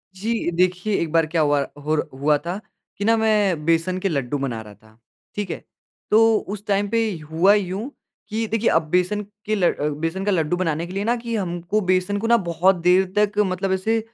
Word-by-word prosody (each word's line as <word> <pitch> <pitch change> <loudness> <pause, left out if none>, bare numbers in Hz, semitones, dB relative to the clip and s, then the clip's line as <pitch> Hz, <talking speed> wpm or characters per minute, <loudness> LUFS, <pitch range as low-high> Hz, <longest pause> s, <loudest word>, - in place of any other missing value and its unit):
जी, 220 +1 -1
देखिए 180 +4 +1
एक 165 - -2
बार 165 0 +3
क्या 160 +1 0
हुआ 145 -1 +3 0.3
होर 155 +2 0
हुआ 150 +1 +4
था 180 +4 -3 0.4
कि 200 - -3
ना 225 +1 +4
मैं 205 -8 +1
बेसन 165 +3 +1
के 195 +1 -1
लड्डू 140 -3 -1
बना 130 -5 -3
रहा 105 -1 -12
था, 110 +2 -23 0.4
ठीक 205 -2 -3
है? - - -6 0.5
तो 225 +1 +5
उस 205 +1 -6
टाइम 200 0 +1
पे 230 0 +1 0.2
हुआ 180 +5 +5
यूँ 205 +4 -1 0.4
कि 225 +1 -1
देखिए 225 +1 +1
अब 165 - +3
बेसन 180 +4 +1 0.2
के 215 - 0
ल 180 -4 +3 0.3
बेसन 165 +4 -2
का 205 - +2
लड्डू 170 -2 +1
बनाने 165 -2 -1
के 180 - -9
लिए 195 +1 -2
ना 235 +3 +1
कि 235 -1 -4
हमको 175 +1 -1
बेसन 185 +1 +1
को 235 +1 +5
बहुत 180 -1 +2
देर 180 +2 +3
तक 210 0 +2
मतलब 190 +1 -2
ऐसे 220 +4 +1
185 Hz, 205 wpm, -22 LUFS, 165-210 Hz, 0.5 s, तो